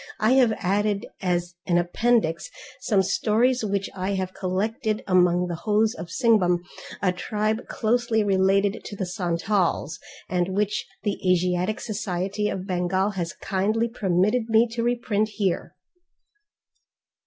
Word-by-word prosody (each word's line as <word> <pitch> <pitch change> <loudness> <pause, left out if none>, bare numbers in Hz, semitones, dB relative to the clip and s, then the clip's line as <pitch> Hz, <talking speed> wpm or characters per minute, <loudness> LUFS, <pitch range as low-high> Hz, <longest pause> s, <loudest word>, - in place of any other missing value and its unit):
I 215 +3 +3
have 255 -3 +5
added 200 +2 0 0.2
as 175 -1 -1
an 175 -2 +3
appendix 175 -1 +1 0.3
some 195 -3 +2
stories 235 +6 +1
which 200 -2 -1
I 190 +1 -2 0.2
collected 210 +4 -2
among 180 -1 +3
the 175 - -4
Hos 215 +5 +1
of 175 - -7
Singhbhum, 180 -5 +2 0.4
a 185 - +3
tribe 215 +4 -2
closely 230 -1 +1
related 195 +1 +2
to 205 - -7
the 195 - -3
Santals, 175 -2 -1 0.3
and 180 +1 -1
which 210 +3 -1 0.2
the 205 -2 -1
Asiatic 180 +3 +1
Society 205 -1 -2
of 190 -1 -4
Bengal 185 +1 0
has 175 -4 -4
kindly 215 +4 0
permitted 210 +1 0
me 225 +1 +5
to 230 +1 -3
reprint 230 -3 0
here. 190 -3 -1
200 Hz, 130 wpm, -24 LUFS, 180-220 Hz, 0.4 s, have